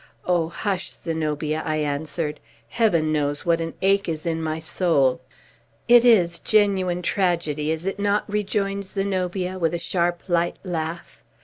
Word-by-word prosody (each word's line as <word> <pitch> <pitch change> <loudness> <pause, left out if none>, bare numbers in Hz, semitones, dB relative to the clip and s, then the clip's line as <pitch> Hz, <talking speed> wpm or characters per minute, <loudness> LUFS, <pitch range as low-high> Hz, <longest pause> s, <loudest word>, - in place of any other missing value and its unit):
"Oh, 175 -2 +1
hush, 190 +1 -3
Zenobia!" 155 -1 -2
I 155 - -1
answered. 150 +1 -2 0.3
"Heaven 170 -9 +2
knows 145 0 0
what 170 -1 +2
an 165 0 -4
ache 195 -1 +3
is 155 0 -4
in 165 -1 -1
my 160 0 -2
soul!" 160 -5 +1 0.7
"It 240 0 +7
is 180 -8 +4
genuine 190 -4 +2
tragedy, 170 -6 0
is 160 +2 -2
it 195 +1 -2
not?" 205 +1 +1
rejoined 200 -1 -1
Zenobia, 185 -1 -2
with 165 -1 +1
a - - -3
sharp, 175 0 -1
light 175 -1 +1
laugh. 170 -2 -5
170 Hz, 145 wpm, -23 LUFS, 160-195 Hz, 0.7 s, It